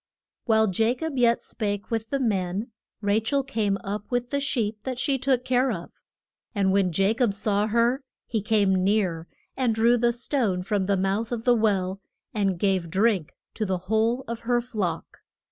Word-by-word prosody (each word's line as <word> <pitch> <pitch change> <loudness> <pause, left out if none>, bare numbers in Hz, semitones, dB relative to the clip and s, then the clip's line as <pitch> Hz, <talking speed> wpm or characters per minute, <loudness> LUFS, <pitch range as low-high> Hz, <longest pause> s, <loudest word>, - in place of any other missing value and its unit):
While 220 -2 +4
Ja 225 +6 +2
cob 320 +2 -4
yet 235 -1 +3
spake 205 -1 -3
with 225 -1 -2
the 275 - 0
men, 205 -2 -1 0.3
Ra 205 +1 +2
chel 275 +5 +1
came 220 -7 0
up 205 0 -5
with 245 -1 -1
the 280 - +1
sheep 230 -6 -1
that 255 +1 -4
she 270 +1 +1
took 255 -1 +1
care 255 +1 +2
of. - - -6 0.6
And 195 -2 +2
when 195 -2 +2
Ja 195 +5 +2
cob 225 -4 +1
saw 210 0 +1
her, 235 +4 +2 0.2
he 220 -2 -2
came 200 -3 +2
near, 185 -5 +1 0.3
and 250 -4 +1
drew 235 +2 +4
the 240 +1 +3
stone 235 -6 0
from 195 0 -1
the 200 -1 +2
mouth 195 +5 -1
of 230 -2 -3
the 245 - +5
well, 195 -4 0 0.3
and 195 -4 0
gave 190 -2 0
drink 195 -3 +1 0.2
to 220 - -3
the 190 -3 0
whole 220 +7 0
of 235 0 -4
her 240 +1 +1
flock. 210 -9 -4
220 Hz, 185 wpm, -25 LUFS, 195-240 Hz, 0.6 s, the